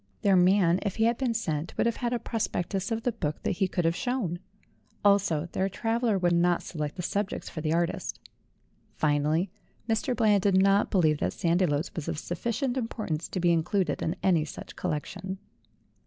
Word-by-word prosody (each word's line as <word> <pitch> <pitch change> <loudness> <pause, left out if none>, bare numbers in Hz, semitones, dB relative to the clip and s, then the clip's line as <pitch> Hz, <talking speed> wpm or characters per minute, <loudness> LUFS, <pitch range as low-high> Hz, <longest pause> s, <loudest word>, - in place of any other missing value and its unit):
Their 200 -2 +5
man, 180 -1 +4
if 200 -3 -2
he 220 - +1
had 230 +1 +2
been 250 -4 0
sent, 160 -7 -2
would - - +2
have 235 -1 0
had 240 -2 -1
a 245 - +1
prospectus 205 -4 -2
of 225 -1 -2
the 245 - +1
book 155 -8 -4
that - - -1
he 195 - +2
could 175 -2 -1
have 165 0 +2
shown. 230 -9 -2 0.7
Also, 195 -6 +3
their 190 +1 0
traveller 225 +1 0
would 175 -2 +2
not 175 0 +2
select 150 -3 -4
the 180 - -5
subjects 200 +2 -2
for 155 - -6
the 155 0 -1
artist. 170 +1 -1 0.8
Finally, 155 +4 +1 0.4
Mr. 225 +3 0
Bland 210 -3 +3
did 195 -1 +3
not 195 +1 +4
believe 155 -6 +3
that - - -1
Sandiloes 170 -2 +1
was 165 -5 -4
of - - -2
sufficient 235 - -2
importance 215 -9 -3
to 185 - -4
be 175 -1 +3
included 170 0 0
in 165 - -1
any 175 -5 +3
such 155 - -9
collection. 190 +5 -4
185 Hz, 185 wpm, -28 LUFS, 165-220 Hz, 0.8 s, Their